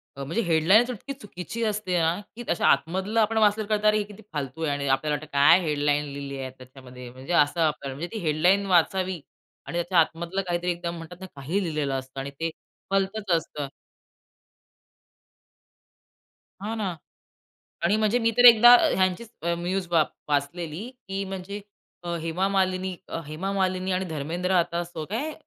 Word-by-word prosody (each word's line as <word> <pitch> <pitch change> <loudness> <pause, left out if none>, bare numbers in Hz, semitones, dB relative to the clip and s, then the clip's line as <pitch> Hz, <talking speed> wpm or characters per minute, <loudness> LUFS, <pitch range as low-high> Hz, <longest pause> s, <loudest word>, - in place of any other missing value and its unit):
अ, 140 - -6
म्हणजे 170 +12 -1
हेडलाईन 170 +6 +5
इतकी 250 +5 -6
चुकीची 225 -2 -6
असते 210 -4 -1
ना, 165 +3 +1 0.2
की 240 - -7
अशा 170 - +1
आतमधलं 190 +7 +1
आपण 220 +1 +2
वाचलं 215 0 +3
तर - - -10
कळतं, 215 0 +2
अरे, 215 - +5
हे 210 - 0
किती 205 +1 -13
फालतू 145 +1 -4
आहे. 150 - +1
आणि 140 0 -3
आपल्याला 135 +3 +1
वाटतं, 155 +1 -7
काय 140 +5 +6
हेडलाईन 150 -2 +1
लिहली 140 -1 -6
आहे 130 -1 -4
त्याच्यामध्ये, 130 -1 -12
म्हणजे 130 +7 -6
असं 150 0 +3
आपल्याला. 150 -4 -1
म्हणजे 160 +5 -4
ती - - -2
हेडलाईन 180 +6 +3
वाचावी 185 0 +2 0.5
आणि 170 - -4
त्याच्या 175 +1 +2
आतमधलं 170 +4 0
काहीतरी 175 +1 0
एकदम 170 0 -4
म्हणतात 165 +2 -10
ना, - - -6
काहीही 155 +9 -2
लिहिलेलं 150 -5 -2
असतं 130 +1 -9
आणि 140 +1 -5
ते 165 0 -1 0.4
भलतंच 195 +1 0
असतं. 150 -3 -5 2.9
हां 220 +2 -3
ना 195 -5 -2 0.9
आणि 190 +5 +3
म्हणजे 215 +2 +2
मी 230 -1 +2
तर 245 - +5
एकदा 240 +1 +10
अ, 245 - +5
ह्यांची 185 +3 +1 0.2
अ, 170 +1 0
न्यूज 180 +1 -2
वा 165 -2 +5 0.3
वाचलेली, 155 - -2 0.2
की 195 +1 -2
म्हणजे 195 +1 -6 0.4
अ, 170 - -2
हेमा 165 +3 0
मालिनी 185 -1 0
अ, - - -4
हेमा 165 +6 -4
मालिनी 185 -1 0
आणि 185 +1 0
धर्मेंद्र 165 +4 -3
आता 170 -1 +1
असं 170 -2 -6
काय 275 +9 -2
175 Hz, 175 wpm, -26 LUFS, 155-195 Hz, 2.9 s, एकदा